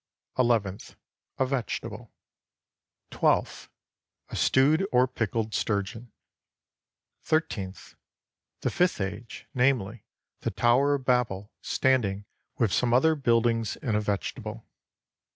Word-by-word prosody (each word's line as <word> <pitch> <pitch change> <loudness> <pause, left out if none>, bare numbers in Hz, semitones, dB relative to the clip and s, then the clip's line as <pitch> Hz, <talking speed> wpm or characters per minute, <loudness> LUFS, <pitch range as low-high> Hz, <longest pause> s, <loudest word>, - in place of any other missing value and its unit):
Eleventh 115 -5 0 0.4
A 130 - +2
vegetable. 130 -3 -4 1.0
Twelfth - - +1 0.6
A - - -6
stewed 145 +7 +3
or 125 +1 +5
pickled 115 -3 -2
sturgeon. 110 +3 -2 1.1
Thirteenth 100 - -2 0.7
The - - 0
fifth 180 -6 +1
age, 100 +4 -5
namely, 120 -5 +1 0.4
the - - -2
Tower 135 +5 +3
of 135 -2 -6
Babel, 110 -6 0
standing 105 -7 +1 0.3
with 110 -7 +1
some 120 -1 +2
other 160 +6 +5
buildings 115 -5 +1
in 120 -6 -3
a 105 - +2
vegetable. 105 +2 -4
120 Hz, 100 wpm, -27 LUFS, 105-130 Hz, 1.1 s, or